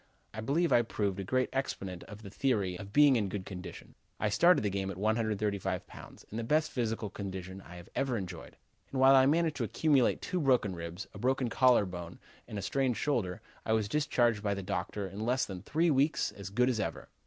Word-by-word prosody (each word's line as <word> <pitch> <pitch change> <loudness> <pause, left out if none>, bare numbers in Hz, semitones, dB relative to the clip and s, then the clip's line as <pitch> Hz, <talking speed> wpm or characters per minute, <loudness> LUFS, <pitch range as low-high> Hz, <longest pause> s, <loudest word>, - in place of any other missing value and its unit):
I 110 - -5
believe 155 +9 +1
I 120 - +6
proved 100 -4 -2
a - - -2
good 130 +6 +1
exponent 95 -9 -3
of 105 +1 -11
the 100 - -9
theory 105 -7 0
of 100 0 -8
being 145 +2 +6
in 105 -3 0
good 95 0 -4
condition. 90 -1 -9 0.3
I 105 - +1
started 175 - +4
the 105 - 0
game 95 0 -2
at 95 - -6
135 105 -3 -1
pounds, - - -13
in 110 - -5
the 115 - -2
best 155 +6 +1
physical 115 -4 -2
condition 95 -1 -6
I 90 - -12
have 90 +1 -11
ever 130 -3 0
enjoyed, 90 -4 -7 0.3
and 135 - -2
while 135 +1 +7
I 135 0 +6
managed 160 +1 +2
to - - -1
accumulate 145 -6 +2
two 185 - -2
broken 125 -9 +2
ribs, 85 +2 -6
a 100 - -9
broken 130 +1 +1
collar 125 -3 +4
bone 90 -2 -7 0.3
and 105 - -6
a 100 - -4
sprained 130 +1 0
shoulder, 110 -9 -1 0.2
I 110 - 0
was 110 -2 +1
discharged 120 -5 +1
by 100 -1 0
the 100 - -5
doctor 100 +1 -3
in 100 +2 -8
less 125 +4 +1
than 95 -3 -7
three 160 - +1
weeks 145 +3 +2
as 100 -1 -8
good 125 +5 +2
as 125 -4 0
ever. 85 -6 -3
110 Hz, 220 wpm, -31 LUFS, 95-130 Hz, 0.3 s, while